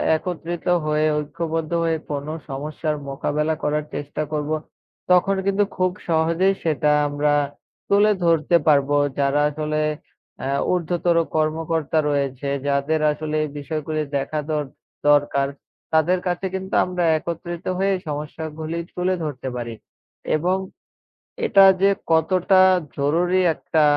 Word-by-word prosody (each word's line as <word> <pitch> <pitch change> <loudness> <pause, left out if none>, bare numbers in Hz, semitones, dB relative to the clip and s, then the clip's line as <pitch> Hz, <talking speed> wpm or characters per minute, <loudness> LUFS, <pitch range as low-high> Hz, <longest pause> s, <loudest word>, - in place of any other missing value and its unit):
একত্রিত 175 0 -4 0.2
হয়ে, 150 0 +1
ঐক্যবদ্ধ 155 +2 -3
হয়ে, 165 -1 +1 0.2
কোন 145 -1 -3 0.2
সমস্যার 150 +3 -3
মোকাবেলা 150 +3 -1
করার 150 0 0
চেষ্টা 145 +1 -4
করব। 150 0 -2 0.6
তখন 185 +2 +4
কিন্তু 200 +1 +2
খুব 185 0 +2 0.2
সহজেই 165 +4 +2
সেটা 150 -2 +2 0.2
আমরা 145 +1 +1 0.6
তুলে 205 +1 +5
ধরতে 165 0 +3
পারব। 140 -2 +4 0.3
যারা 140 +1 +2
আসলে 155 +1 -2 0.7
আ - - -1 0.3
উর্ধ্বতর 175 0 0 0.2
কর্মকর্তা 155 0 0
রয়েছে। 140 -1 -1 0.2
যাদের 140 +3 +1
আসলে 155 +1 -4
এই 150 - -3
বিষয়গুলি 155 +1 -3 0.2
দেখা 140 +3 -2
দর-ট 150 -3 -1 0.4
দরকার। 145 -1 +3 0.5
তাদের 165 +4 +3
কাছে 180 +2 -1
কিন্তু 190 0 -5
আমরা 180 -1 -2
একত্রিত 170 +2 -6
হয়ে 195 +1 +1
এই 185 - -6
সমস্যা 150 +2 -5 0.2
গুলি 160 +1 -3 0.2
তুলে 180 +1 +1
ধরতে 135 -4 -5
পারি 120 -1 -4 0.6
এবং 180 +4 +1 0.9
এটা 195 -1 +6 0.2
যে 200 - +6 0.2
কতটা 185 +3 +4 0.4
জরুরি, 175 +6 +2
একটা 160 0 0
155 Hz, 125 wpm, -22 LUFS, 145-175 Hz, 0.9 s, এটা